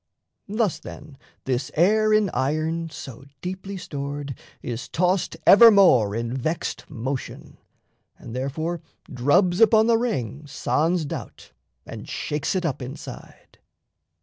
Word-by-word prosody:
Thus, 210 Hz, -3 st, 0 dB
then, 145 Hz, -2 st, -11 dB, 0.3 s
this 130 Hz, 0 st, -1 dB
air 215 Hz, +6 st, +3 dB
in 215 Hz, -4 st, +3 dB
iron 160 Hz, +4 st, -1 dB
so 135 Hz, -5 st, -9 dB, 0.2 s
deeply 190 Hz, +2 st, -5 dB
stored 145 Hz, -4 st, -5 dB, 0.3 s
Is 120 Hz, -1 st, -5 dB
tossed 180 Hz, +2 st, 0 dB
evermore 195 Hz, -, +7 dB
in 115 Hz, +2 st, -3 dB
vexed 155 Hz, +5 st, -3 dB
motion, 130 Hz, +3 st, -6 dB, 0.6 s
And 120 Hz, 0 st, -9 dB
therefore 155 Hz, +6 st, -3 dB, 0.3 s
drubs 175 Hz, -, +2 dB
upon 220 Hz, 0 st, +6 dB
the 230 Hz, -1 st, +3 dB
ring 145 Hz, -, -3 dB
sans 160 Hz, +4 st, 0 dB
doubt -, -, -8 dB, 0.3 s
And -, -, -9 dB
shakes 150 Hz, +5 st, -2 dB
it 185 Hz, -2 st, -1 dB
up 140 Hz, -5 st, -2 dB
inside.... 125 Hz, +2 st, -10 dB
155 Hz, 120 wpm, -24 LUFS, 135-190 Hz, 0.6 s, evermore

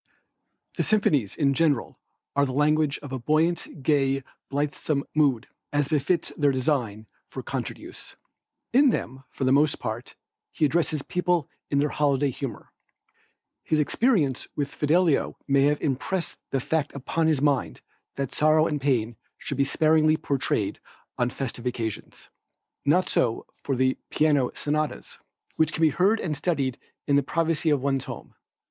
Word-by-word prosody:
The -, -, +1 dB
symphonies 150 Hz, -, +2 dB
in 140 Hz, -2 st, +2 dB
general 145 Hz, -3 st, 0 dB, 0.4 s
are 140 Hz, 0 st, +3 dB
the 130 Hz, -, -4 dB
language 150 Hz, +1 st, +2 dB
of 145 Hz, -, -8 dB
a 130 Hz, -, -3 dB
buoyant, 155 Hz, +2 st, 0 dB
gay, 135 Hz, -2 st, +2 dB, 0.3 s
blithesome 145 Hz, 0 st, -1 dB
mood, 140 Hz, -6 st, +2 dB, 0.3 s
as 145 Hz, -1 st, 0 dB
befits 160 Hz, +3 st, 0 dB
their 145 Hz, -2 st, +3 dB
design 125 Hz, -6 st, -1 dB, 0.2 s
for -, -, -7 dB
concert -, -, -4 dB
use. -, -, -12 dB, 0.6 s
In 275 Hz, +2 st, +6 dB
them, 130 Hz, -, -3 dB
for -, -, -5 dB
the 130 Hz, -, +3 dB
most 145 Hz, +2 st, +3 dB
part, 110 Hz, +3 st, -5 dB, 0.4 s
he 155 Hz, -, +2 dB
addresses 155 Hz, -1 st, 0 dB
people 180 Hz, -4 st, 0 dB, 0.2 s
in 140 Hz, -, 0 dB
their 145 Hz, +1 st, +2 dB
holiday 140 Hz, -2 st, +1 dB
humor. 125 Hz, -3 st, -7 dB, 0.9 s
His 155 Hz, -, +1 dB
experience 150 Hz, -, +1 dB
with 140 Hz, -2 st, -2 dB
Fidelio 160 Hz, +1 st, +2 dB
may 140 Hz, -1 st, +4 dB
have 150 Hz, 0 st, +2 dB
impressed 160 Hz, +6 st, -1 dB
the 135 Hz, -, 0 dB
fact 155 Hz, +3 st, -1 dB
upon 160 Hz, +4 st, -1 dB
his 155 Hz, -4 st, +2 dB
mind 145 Hz, -2 st, +1 dB, 0.3 s
that 135 Hz, -1 st, -3 dB
sorrow 155 Hz, +1 st, +4 dB
and 150 Hz, -3 st, -2 dB
pain 120 Hz, -5 st, +1 dB, 0.2 s
should 140 Hz, -, -5 dB
be 140 Hz, -, +4 dB
sparingly 155 Hz, +1 st, +3 dB
portrayed 140 Hz, -4 st, -1 dB, 0.4 s
on 125 Hz, 0 st, +2 dB
festive 125 Hz, -2 st, -5 dB
occasions. 115 Hz, -3 st, -5 dB, 0.6 s
Not 175 Hz, +6 st, +3 dB
so 115 Hz, -2 st, 0 dB, 0.2 s
with 135 Hz, -2 st, 0 dB
the 130 Hz, 0 st, +1 dB
piano 145 Hz, -5 st, +2 dB
sonatas, 150 Hz, +1 st, -3 dB, 0.4 s
which 160 Hz, 0 st, +3 dB
can 165 Hz, -, -1 dB
be 160 Hz, -, +6 dB
heard 195 Hz, +9 st, +2 dB
and 155 Hz, -3 st, -2 dB
studied 140 Hz, -5 st, -1 dB, 0.3 s
in 140 Hz, -1 st, +3 dB
the -, -, +4 dB
privacy 165 Hz, +3 st, 0 dB
of 145 Hz, -3 st, +2 dB
one's 135 Hz, -2 st, 0 dB
home. -, -, -8 dB
145 Hz, 155 wpm, -26 LUFS, 135-155 Hz, 0.9 s, In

